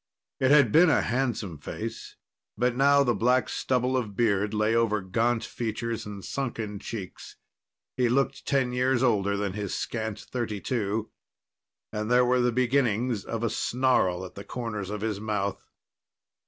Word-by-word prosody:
It 130 Hz, -, +3 dB
had 140 Hz, -6 st, +6 dB
been 165 Hz, +5 st, +6 dB
a -, -, +3 dB
handsome 115 Hz, -, -2 dB
face, -, -, -6 dB, 0.4 s
but 125 Hz, 0 st, +1 dB
now 140 Hz, +2 st, +5 dB
the 120 Hz, -3 st, +2 dB
black 125 Hz, +4 st, +2 dB
stubble 130 Hz, 0 st, 0 dB
of 110 Hz, -6 st, -2 dB
beard 105 Hz, -3 st, +2 dB
lay 110 Hz, +1 st, +1 dB
over 115 Hz, -2 st, +2 dB
gaunt 115 Hz, +5 st, 0 dB
features 115 Hz, -1 st, -4 dB
and 100 Hz, -2 st, -8 dB
sunken 115 Hz, -6 st, -4 dB
cheeks. 100 Hz, -3 st, -7 dB, 0.6 s
He 125 Hz, -2 st, +2 dB
looked 135 Hz, +3 st, 0 dB
ten 130 Hz, -3 st, +1 dB
years 125 Hz, 0 st, +2 dB
older 100 Hz, -5 st, +2 dB
than 100 Hz, -2 st, -2 dB
his 100 Hz, -2 st, -3 dB
scant 110 Hz, -3 st, -3 dB
thirty 115 Hz, -5 st, -4 dB
two, 110 Hz, -1 st, -2 dB, 0.8 s
and 105 Hz, 0 st, -3 dB
there 125 Hz, 0 st, +5 dB
were 125 Hz, 0 st, +3 dB
the 120 Hz, 0 st, +2 dB
beginnings 125 Hz, -3 st, +1 dB
of 115 Hz, +2 st, -4 dB
a 115 Hz, -, +1 dB
snarl 115 Hz, -8 st, +1 dB
at 90 Hz, -, -10 dB
the 100 Hz, -, -8 dB
corners 105 Hz, -6 st, -5 dB
of 105 Hz, 0 st, -4 dB
his 110 Hz, -2 st, -2 dB
mouth. 105 Hz, -2 st, -3 dB
115 Hz, 160 wpm, -27 LUFS, 105-125 Hz, 0.8 s, had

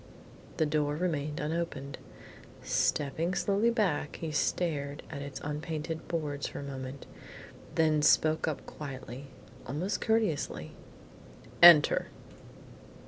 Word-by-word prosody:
The 160 Hz, -, +3 dB
door 150 Hz, -1 st, 0 dB
remained 155 Hz, -3 st, -2 dB
unopened. 150 Hz, -3 st, -3 dB, 0.6 s
Stepping 160 Hz, +5 st, 0 dB
slowly 205 Hz, +3 st, +2 dB
back, 195 Hz, -11 st, 0 dB
he 160 Hz, -2 st, -5 dB
stared 145 Hz, -2 st, -1 dB
at 140 Hz, -3 st, -5 dB
its 140 Hz, -1 st, -6 dB
unpainted 155 Hz, +2 st, -4 dB
boards 150 Hz, -4 st, -2 dB
for -, -, -7 dB
a -, -, -6 dB
moment, 135 Hz, -1 st, -7 dB, 0.7 s
then 155 Hz, -1 st, +3 dB
he -, -, +1 dB
spoke 155 Hz, +1 st, +3 dB
up 155 Hz, -, -3 dB
quietly, 135 Hz, -2 st, -8 dB, 0.4 s
almost 180 Hz, -, -2 dB
courteously: 220 Hz, -9 st, 0 dB, 0.9 s
"Enter." 170 Hz, -4 st, +8 dB
150 Hz, 110 wpm, -30 LUFS, 145-165 Hz, 0.9 s, Enter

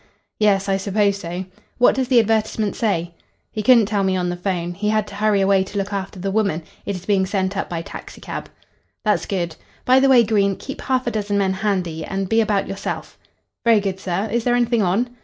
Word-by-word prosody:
"Yes, 200 Hz, -2 st, +3 dB
I 195 Hz, -1 st, +2 dB
suppose 200 Hz, +1 st, +1 dB
so. 180 Hz, 0 st, -5 dB, 0.3 s
What 245 Hz, -, +5 dB
does 260 Hz, -1 st, -1 dB
the 250 Hz, -2 st, +5 dB
advertisement 220 Hz, -1 st, 0 dB
say?" 175 Hz, -6 st, -1 dB, 0.4 s
"He 215 Hz, -, -3 dB
couldn't 230 Hz, 0 st, +6 dB
tell 205 Hz, -1 st, 0 dB
me 190 Hz, -1 st, +1 dB
on 180 Hz, -1 st, -1 dB
the 175 Hz, -, -2 dB
'phone. 175 Hz, -1 st, -2 dB
He 210 Hz, +4 st, -2 dB
had 215 Hz, -1 st, +1 dB
to -, -, -11 dB
hurry 205 Hz, -1 st, +2 dB
away 195 Hz, 0 st, +3 dB
to 200 Hz, +1 st, -7 dB
look 200 Hz, +1 st, -2 dB
after 195 Hz, -1 st, -4 dB
the 195 Hz, +2 st, -2 dB
woman. 200 Hz, -6 st, 0 dB, 0.2 s
It 200 Hz, -, -1 dB
is 185 Hz, -, -8 dB
being 195 Hz, -2 st, +2 dB
sent 190 Hz, 0 st, -1 dB
up 195 Hz, -, -3 dB
by 165 Hz, -1 st, -3 dB
taxicab." -, -, -8 dB, 0.6 s
"That's 210 Hz, -, +1 dB
good. 175 Hz, -4 st, -2 dB, 0.3 s
By 255 Hz, +1 st, +6 dB
the 270 Hz, 0 st, +4 dB
way, 250 Hz, -3 st, +7 dB
Green, 200 Hz, -3 st, +2 dB
keep 270 Hz, -, -8 dB
half 255 Hz, -1 st, 0 dB
a 240 Hz, -, 0 dB
dozen 205 Hz, -2 st, -1 dB
men 195 Hz, -1 st, +2 dB
handy, 185 Hz, -5 st, -1 dB
and 195 Hz, +2 st, -3 dB
be 225 Hz, 0 st, +4 dB
about 205 Hz, -3 st, 0 dB
yourself." 195 Hz, 0 st, -5 dB, 0.5 s
"Very 230 Hz, -2 st, +5 dB
good, 195 Hz, -2 st, -3 dB
sir. 190 Hz, +2 st, -2 dB
Is 235 Hz, +1 st, 0 dB
there 245 Hz, 0 st, +2 dB
anything 240 Hz, -1 st, +2 dB
on?" 200 Hz, +6 st, +1 dB
200 Hz, 220 wpm, -21 LUFS, 190-220 Hz, 0.6 s, way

